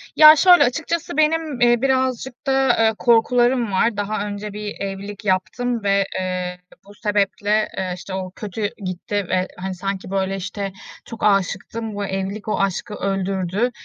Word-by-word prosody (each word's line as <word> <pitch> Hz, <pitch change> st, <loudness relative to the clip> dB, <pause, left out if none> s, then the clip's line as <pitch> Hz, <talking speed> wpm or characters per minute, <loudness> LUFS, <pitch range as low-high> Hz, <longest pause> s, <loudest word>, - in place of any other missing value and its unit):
Ya, 310 Hz, 0 st, +10 dB
şöyle, 355 Hz, +3 st, +7 dB
açıkçası 320 Hz, +4 st, -2 dB
benim, 310 Hz, -4 st, +1 dB
eee, 240 Hz, -1 st, +4 dB
birazcık 260 Hz, -1 st, -1 dB
da, 270 Hz, 0 st, +3 dB
eee, 225 Hz, 0 st, +4 dB
korkularım 240 Hz, +2 st, +3 dB
var. 210 Hz, +3 st, +1 dB
Daha 205 Hz, 0 st, -2 dB
önce 205 Hz, 0 st, -6 dB
1 210 Hz, 0 st, -5 dB
evlilik 200 Hz, +1 st, -6 dB
yaptım 210 Hz, +5 st, -1 dB
ve, 200 Hz, 0 st, +3 dB, 0.2 s
eee, 180 Hz, -1 st, -3 dB, 0.3 s
bu 200 Hz, -, -14 dB
sebeple, 210 Hz, 0 st, +1 dB
eee, 185 Hz, -1 st, -2 dB
işte, 185 Hz, +1 st, -9 dB
o 185 Hz, -1 st, -4 dB
kötü 210 Hz, 0 st, -3 dB, 0.2 s
gitti 185 Hz, +2 st, -3 dB
ve, 185 Hz, 0 st, +1 dB
hani, 190 Hz, +1 st, -4 dB
sanki 195 Hz, +1 st, -4 dB
böyle, 195 Hz, 0 st, 0 dB
işte, 195 Hz, +1 st, -4 dB, 0.3 s
çok 230 Hz, -, -9 dB
âşıktım, 205 Hz, +2 st, 0 dB
bu 205 Hz, 0 st, -2 dB
evlilik 195 Hz, +2 st, -4 dB
o 215 Hz, -, 0 dB
aşkı 195 Hz, +1 st, -1 dB
öldürdü, 195 Hz, +3 st, -1 dB
205 Hz, 155 wpm, -21 LUFS, 195-240 Hz, 0.3 s, Ya